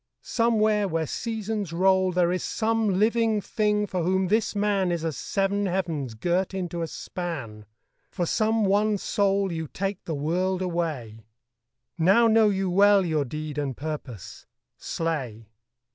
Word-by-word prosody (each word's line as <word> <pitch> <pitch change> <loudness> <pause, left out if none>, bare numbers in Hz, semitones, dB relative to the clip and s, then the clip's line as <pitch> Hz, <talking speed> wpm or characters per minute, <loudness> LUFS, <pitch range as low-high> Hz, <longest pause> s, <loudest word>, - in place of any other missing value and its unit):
somewhere 215 -3 +2
where 165 -2 -1
seasons 215 - -3
roll 190 +2 +3
There 175 -1 +2
is 180 - -2
some 220 -3 0
living 225 +1 +2
thing 210 0 0
for 185 -3 -3
whom 185 +2 +1
this 220 +1 +1
man 200 -3 +1
Is 170 -1 -2
as 160 -3 -2
seven 200 +6 -1
heavens 165 -10 -2
girt 180 - -1
into 175 -2 -3
a 165 - -2
span, 135 - -6 0.4
For 175 - -2
some 220 +4 +1
one 205 +2 +2
soul 195 -1 0
you 160 -1 -4
take 195 +4 -4
the 160 - -3
world 180 +6 -1
away 145 - -3 0.7
Now 195 +8 +5
know 220 -1 +5
you 195 -1 0
well 200 +1 +5
your 155 -4 0
deed 150 +2 -5
and 135 -4 -3
purpose. 145 - -7 0.3
Slay!' 135 -10 -4
185 Hz, 145 wpm, -26 LUFS, 160-205 Hz, 0.7 s, Now